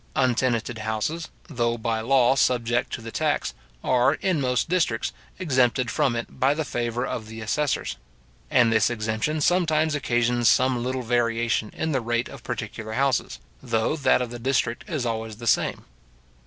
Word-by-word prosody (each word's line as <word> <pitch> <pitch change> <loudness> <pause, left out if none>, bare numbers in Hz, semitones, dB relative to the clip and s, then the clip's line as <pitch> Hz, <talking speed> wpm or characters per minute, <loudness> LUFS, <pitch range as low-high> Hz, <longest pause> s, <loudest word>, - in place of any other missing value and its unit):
Untenanted 120 -3 +1
houses, 110 +10 -2 0.2
though 120 -6 -1
by 115 -1 -1
law 125 +1 +4
subject 120 -1 +1
to - - -4
the 115 0 -7
tax, - - 0 0.3
are, 130 +3 +3
in 185 -6 0
most 125 -1 +1
districts, 175 - 0 0.2
exempted 130 -7 +1
from 125 -4 +1
it 115 - -6
by 135 +2 +3
the 155 0 -2
favour 120 0 -2
of 110 -4 -4
the 110 +1 -8
assessors; 135 +6 -1 0.5
and 115 -2 +4
this 110 0 +3
exemption 110 +6 -1
sometimes 160 -2 +2
occasions 120 -4 +2
some 130 0 +3
little 130 0 -2
variation 115 -2 0
in 160 - -1
the 135 -3 0
rate 120 +1 -1
of - - -10
particular 110 0 -5
houses, 135 0 0 0.2
though 110 +6 0
that 130 -4 +3
of 120 - -6
the 120 - -7
district 125 -2 0
is 155 -8 -2
always 110 -1 -3
the 115 - -8
same. 115 - +1
120 Hz, 165 wpm, -25 LUFS, 115-135 Hz, 0.5 s, law